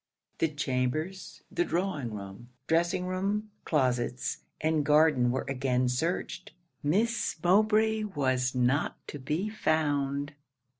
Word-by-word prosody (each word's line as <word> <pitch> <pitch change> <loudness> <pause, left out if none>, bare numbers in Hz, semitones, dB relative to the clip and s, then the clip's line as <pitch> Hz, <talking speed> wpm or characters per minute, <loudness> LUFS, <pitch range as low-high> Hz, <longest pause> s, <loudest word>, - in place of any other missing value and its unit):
The 165 - +3
chambers, 150 +5 -2
the 175 - +1
drawing 165 - -2
room, 100 +4 -9 0.2
dressing 170 +2 +1
room, 200 +3 -1
closets, 125 -4 0 0.2
and 155 -1 +1
garden 150 -4 +4
were 130 +2 -1
again 130 -2 +1
searched. 160 +4 -2 0.3
Miss 225 +10 +1
Mowbray 215 +3 +3
was 130 -8 0
not 125 +4 +1
to 145 - -6
be 155 +9 -1
found! 145 -7 0
150 Hz, 110 wpm, -29 LUFS, 130-185 Hz, 0.3 s, garden